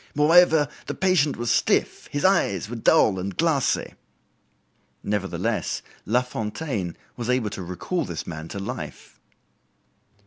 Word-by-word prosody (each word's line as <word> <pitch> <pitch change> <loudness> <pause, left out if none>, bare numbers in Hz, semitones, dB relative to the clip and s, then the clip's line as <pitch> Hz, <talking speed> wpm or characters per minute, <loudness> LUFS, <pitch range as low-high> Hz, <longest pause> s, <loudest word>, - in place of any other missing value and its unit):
Moreover, 160 0 +5 0.2
the - - -3
patient 180 -6 +2
was 120 0 -1
stiff, - - +1
his 145 +3 -1
eyes 100 - +2
were 120 - -6
dull 105 -3 +4
and 95 +2 -5
glassy." 160 -6 +1 1.1
Nevertheless, 100 -2 -2 0.2
Lafontaine 110 - -2 0.2
was 120 -1 -5
able 125 -5 +1
to 100 - -6
recall 90 - -3
this 85 - -5
man 80 -2 -6
to 100 - -7
life. 100 - -7
120 Hz, 125 wpm, -24 LUFS, 95-150 Hz, 1.1 s, Moreover